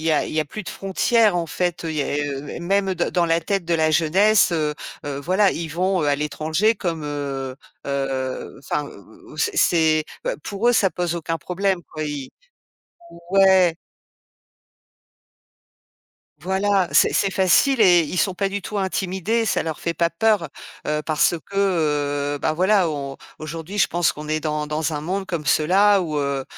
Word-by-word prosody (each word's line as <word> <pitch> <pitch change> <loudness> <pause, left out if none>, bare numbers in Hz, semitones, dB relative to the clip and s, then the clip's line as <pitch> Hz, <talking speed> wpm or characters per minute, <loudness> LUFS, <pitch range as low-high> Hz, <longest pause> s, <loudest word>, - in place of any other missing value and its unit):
y 160 - +1
a 150 - +1
il - - -7
y 155 - +2
a - - -1
plus 210 +8 -8
de - - -7
frontières 210 +2 +2
en 170 -1 -1
fait. 175 +1 -2
Il 160 - -3
y 150 - 0
a - - -3 0.2
heu, 145 0 -5
et - - -7
même 195 +2 +1
dans 175 -1 -1
dans 175 -1 +1
la 165 0 +2
tête 195 +2 -2
de 170 - -2
la 160 -1 +2
jeunesse, 185 +6 +3
heu 155 -2 0 0.3
heu, 140 -1 -4
voilà, 190 +5 +2
ils 165 -2 -4
vont, 180 +3 0
heu, - - 0
à 145 - +3
l'étranger 155 +8 0
comme, 165 -6 -4
heu 140 -3 -4 0.3
heu, 135 -2 -3
enfin, 150 +1 -3
ou 100 -8 -15
ou - - -13
ou - - -12
c'est - - 0
c'est 160 -2 +3 0.2
bah, - - -1
pour 205 +4 0
eux, - - +5
ça 195 -4 +3
pose 175 -1 -2
aucun 165 -1 -3
problème 185 +3 -1
quoi, 155 - -4
i 145 -3 -5 1.0
ouais. 190 -3 +5 2.7
Voilà, 190 +2 +1
c'est - - +4
c'est 195 - +1
facile 195 +8 +3
et 180 -4 +6
ils 170 +4 -4
sont 190 -2 +1
pas 195 +1 -1
du 200 +1 -4
tout 210 +3 -6
intimidés, 190 +4 -1
ça - - +1
leur 160 -2 -4
fait 170 - -3
pas 170 0 +1
peur, 190 -1 +1 0.4
heu, 150 0 0
parce 155 +2 +2 0.2
que, 150 -7 0
heu, - - -4
bah, 155 - 0
voilà 185 +1 +2
on 140 -2 -5 0.2
aujourd'hui, 165 +5 -6
je - - +5
pense 175 -2 +1
qu'on 150 0 -9
est 155 0 0
dans 150 0 -2
dans 155 +1 -2
un 150 - -3
monde 190 +5 -3
comme 165 -5 -4
cela 190 +8 +4
où, 155 -3 -3
heu 140 -1 -2
170 Hz, 195 wpm, -22 LUFS, 150-190 Hz, 2.7 s, et